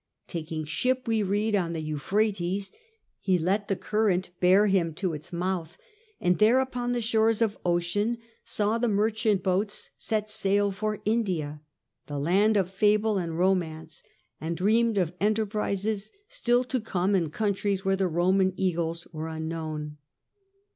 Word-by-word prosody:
Taking 160 -2 -4
Gulf. 150 - -8
ship, 255 +8 0
we 225 -1 +2
read, 205 +2 +1
on 170 -4 0
the 165 - -3
Euphrates, 190 +5 -1 0.5
he 185 -2 +2
let 195 +5 0
the 195 - +1
current 190 -4 0
bear 185 +3 +5
him 180 -6 +1
to 185 -1 -1
its 150 0 -8
mouth, 175 -1 -3 0.4
and 180 0 +1
there 225 +5 +5
upon 245 -2 -1
the 240 -1 -1
shores 225 -1 +2
of 220 -3 +1
ocean 175 +6 0 0.3
saw 215 +2 0
the 240 - +1
merchant 215 -1 +1
boats 195 +2 -1
set 215 -1 -1
sail 205 -1 +1
for 210 +2 -3
India, 180 -10 -1 0.5
the 145 - -4
land 195 +9 +3
of 190 -2 0
fable 210 +1 +2
and 165 -2 -3
romance, 165 -4 0 0.4
and 165 +1 -3
dreamed 220 +4 +2
of 180 -3 +1
enter 215 +1 +2
prises 210 0 -2 0.2
still 245 +1 +1
to 255 0 -2
come 195 -2 0
in 170 -5 +2
countries 200 +1 -1
where 195 0 +3
the 190 -1 +1
Roman 185 +3 +2
eagles 170 -2 -1
were 155 +1 -4
unknown. 160 -2 -5
195 Hz, 155 wpm, -27 LUFS, 170-215 Hz, 0.5 s, bear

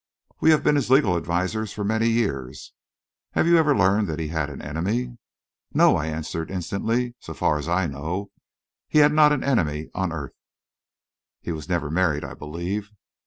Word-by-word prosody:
"We - - +4
have 155 -1 +4
been - - +4
his 135 -4 -1
legal 130 -9 +4
advisers 90 +6 -2
for 105 - -4
many 110 +3 +1
years." 70 - -2 0.6
"Have - - +2
you 170 0 +5
ever 150 -5 +3
learned 100 +2 +3
that 80 -2 -3
he 80 -2 -3
had 80 -2 -2
an 70 - -8
enemy?" 110 +11 -3 0.6
"No," - - +6
I 75 - -1
answered 80 +1 -4
instantly; 115 +7 -2
"so - - -9
far 75 - +1
as 75 - -5
I 90 +2 +2
know, 80 +7 -4 0.6
he - - 0
had 150 0 +6
not 150 -1 +6
an 145 -3 0
enemy 80 - 0
on 95 -2 -1
earth." 75 -4 -6 1.1
"He - - -5
was 80 -1 -6
never 80 -5 -1
married, 80 -3 +1
I - - -6
believe?" 85 +7 -5
95 Hz, 180 wpm, -24 LUFS, 80-115 Hz, 1.1 s, No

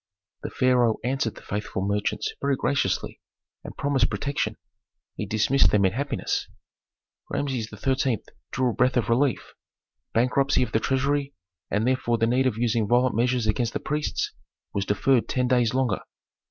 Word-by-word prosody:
The - - -4
pharaoh 125 -3 +3
answered 125 -2 -1
the - - -13
faithful 105 -2 -3
merchants 100 +1 -1
very 140 0 +2
graciously, 130 -9 -1 0.4
and - - -9
promised 135 -3 +2
protection. 125 +7 -2 0.6
He 105 - -4
dismissed 110 +6 +3
them 100 -2 +3
in 95 - +3
happiness. 140 +5 -2 0.8
Rameses 130 -6 -2
XIII. 130 +1 -1 0.3
drew 130 -1 0
a - - -5
breath 125 +3 +2
of 115 -3 0
relief: 125 +2 +1 0.6
bankruptcy 130 +4 +2
of - - -4
the 110 - +2
treasury, 140 +3 0 0.3
and 105 +3 0
therefore 125 -2 +1
the 115 - +2
need 125 +3 +2
of 115 -4 -1
using 115 -2 +1
violent 125 +3 +3
measures 120 0 +1
against 115 +2 0
the - - -1
priests 150 +1 -2 0.4
was 100 0 -2
deferred 120 +4 +2
ten 125 -1 +1
days 125 -2 +2
longer. 130 -6 +1
125 Hz, 155 wpm, -25 LUFS, 110-135 Hz, 0.8 s, pharaoh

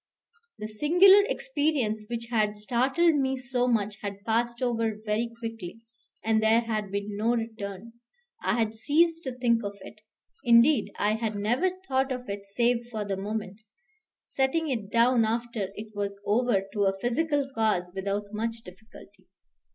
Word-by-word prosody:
The 215 - -5
singular 355 - +6
experience 265 -7 -1
which 235 -1 -4
had 210 -2 +1
startled 260 +10 +2
me 265 -1 0
so 250 -1 -1
much 215 -3 0
had 200 0 -6
passed 235 +1 0
over 230 -3 0
very 220 +2 0
quickly, 225 -3 -7 0.4
and 220 0 +3
there 220 +1 +4
had 215 -4 -3
been 200 +1 -3
no 225 +4 +1
return. 225 -1 -5 0.5
I - - +1
had 225 -2 0
ceased 330 +8 +2
to 260 - -2
think 235 -2 +2
of 200 0 -5
it; 215 +2 -12 0.4
indeed, 240 +4 +5
I 210 +1 +1
had 220 -1 -2
never 240 - +1 0.2
thought 265 0 +1
of 250 -1 -4
it 200 0 -5
save 235 +3 +1
for 215 -3 -4
the 200 -1 -2
moment, 205 +1 -5 0.6
setting 280 +3 -1
it 220 -6 -3
down 235 +1 +4
after 230 -2 -2
it 215 0 -9
was 200 -1 -3
over 220 -2 +2
to 205 -1 +1
a 195 0 +1
physical 285 +4 0
cause 215 -6 0
without 200 +2 -3
much 225 +1 -3
difficulty. 190 +5 -15
225 Hz, 160 wpm, -27 LUFS, 210-250 Hz, 0.6 s, singular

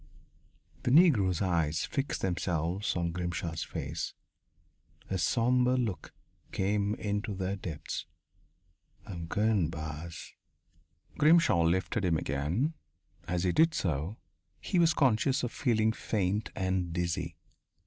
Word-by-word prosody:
The - - -1
Negro's 120 - +5
eyes 80 -3 +1
fixed 140 +1 -2
themselves 90 +1 -1
on 85 -1 0
Grimshaw's 85 -2 -3
face - - -4 1.0
a 95 - 0
sombre 125 +6 +3
look 115 -8 -2 0.4
came 100 +2 0
into 105 -1 -2
their 95 +1 -2
depths. 80 -5 -5 1.0
"I'm 85 -4 -6
goin', 105 -3 +2
boss." 80 +1 -7 0.9
Grimshaw 150 - +5
lifted 95 +6 +1
him 85 -3 +2
again. 80 - -1 0.5
As 85 0 -1
he 90 - +2
did 160 - +4
so, 85 +4 -1 0.4
he 185 - 0
was 165 -1 +4
conscious 130 0 +2
of 120 - -1
feeling 110 -4 +2
faint 105 -2 -1
and 95 -2 -1
dizzy. 85 -1 -2
95 Hz, 115 wpm, -30 LUFS, 85-115 Hz, 1.0 s, Negro's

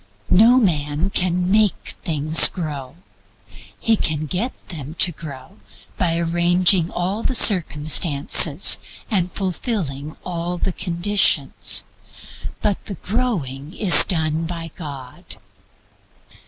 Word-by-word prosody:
No 225 +7 +5
man 160 - -1
can 180 0 -1
make 210 -1 0
things 155 0 +5
grow. 150 -6 -7 0.8
He 225 - +1
can 155 -6 -3
get 190 - -3 0.2
them 155 -3 -9
to 175 - +2
grow 140 -7 -12 0.4
by 165 -2 -1
arranging 175 +1 +1
all 190 +5 -4
the 255 - -2
circumstances 155 -7 +4 0.3
and 185 -4 0
fulfilling 175 - -5
all 175 0 -5
the 185 +1 -3
conditions. 175 -6 +1 0.8
But 205 -2 -2
the 200 - -5
growing 170 - -4
is 190 -5 +7
done 160 -3 -2
by 165 -2 -7
God. 140 -6 -9
170 Hz, 105 wpm, -19 LUFS, 150-190 Hz, 0.8 s, is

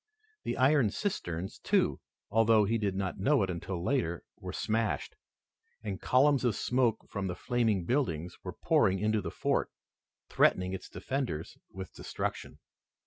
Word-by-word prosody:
The - - -2
iron 130 -3 +4
cisterns, 95 - -3
too, - - +2 0.3
although 110 -1 +5
he 115 +3 +1
did 100 -3 -1
not 95 0 -2
know 135 +3 +3
it 95 - -1
until 85 0 -4
later, 90 - 0 0.2
were - - -6
smashed, 110 -1 -1 0.7
and 100 -4 -4
columns 140 +1 +4
of 120 -5 +2
smoke 120 0 +1
from 100 -1 -3
the 90 - -3
flaming 110 -4 0
buildings 90 - -1
were - - -5
pouring 95 - +2
into 105 +2 +1
the - - -4
fort, - - 0 0.6
threatening 90 0 +3
its 95 - -6
defenders 130 - -3 0.2
with 95 -1 -8
destruction. - - -4
105 Hz, 145 wpm, -31 LUFS, 95-125 Hz, 0.7 s, although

